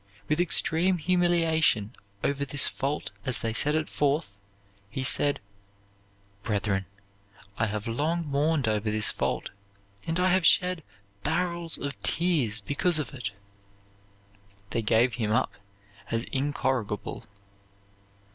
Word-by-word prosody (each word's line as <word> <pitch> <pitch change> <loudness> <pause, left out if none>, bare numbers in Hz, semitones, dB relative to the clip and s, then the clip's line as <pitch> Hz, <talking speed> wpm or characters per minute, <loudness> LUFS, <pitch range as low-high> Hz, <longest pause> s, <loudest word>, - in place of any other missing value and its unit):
With 155 +3 +2
extreme 175 +1 +3
humiliation 165 - +2 0.3
over 140 0 0
this 140 0 +2
fault 140 +2 -2
as 125 -4 +3
they 115 -1 -1
set 150 +6 +2
it 155 0 0
forth, 145 -5 0 0.6
he 130 - -3
said, 145 +2 +2 1.0
"Brethren, 100 -2 -1 0.7
I 110 - +2
have 105 0 -4
long 155 +8 0
mourned 145 -1 +1
over 105 0 0
this 110 0 +3
fault, - - -2 0.6
and 165 +2 0
I 185 0 +3
have 185 -1 +3
shed 180 +1 +4 0.4
barrels 170 - 0
of 140 0 -5
tears 145 -11 +1
because 160 +4 +1
of 150 -1 -3
it." 125 -7 -4 1.4
They 115 - 0
gave 115 +3 +3
him 105 - 0
up 115 - +2 0.6
as 115 0 -1
incorrigible. 130 -6 -2
145 Hz, 120 wpm, -27 LUFS, 115-165 Hz, 1.4 s, shed